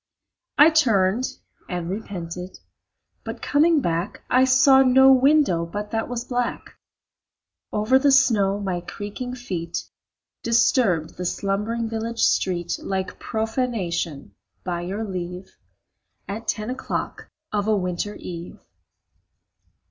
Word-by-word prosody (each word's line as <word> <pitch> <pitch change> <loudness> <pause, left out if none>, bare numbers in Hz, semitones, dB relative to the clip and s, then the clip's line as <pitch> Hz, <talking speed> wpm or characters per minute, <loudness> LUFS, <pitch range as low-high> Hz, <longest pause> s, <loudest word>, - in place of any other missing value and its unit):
I 305 +3 +8
turned 230 -6 +3 0.4
and 175 -2 -3
repented, 180 -2 -6 0.7
but - - -6
coming 310 +1 +3
back 170 0 -2
I 255 +1 +5
saw 265 +1 +6
no 265 +1 +6
window 265 - +4
but 205 +5 -5
that 225 +1 -2
was 240 -1 -3
black. 245 -1 -3 1.0
Over 215 +5 +3
the 280 +1 +4
snow 205 -7 +3
my 185 -3 -2
creaking 210 +7 -6
feet 175 -9 -4 0.6
Disturbed 230 - +2
the 180 - -4
slumbering 210 +5 -1
village 225 +1 -3
street 175 -2 +1
Like 190 -1 -3
profanation, 210 - -2 0.3
by 175 -2 -3
your 195 +5 -4
leave, 180 -2 -6 0.7
At 220 +3 -6
ten 215 +2 -2
o'clock 260 - -4 0.2
of 205 -1 -1
a 215 -1 +3
winter 180 +2 -3
eve. 170 -1 -8
210 Hz, 115 wpm, -23 LUFS, 180-250 Hz, 1.0 s, I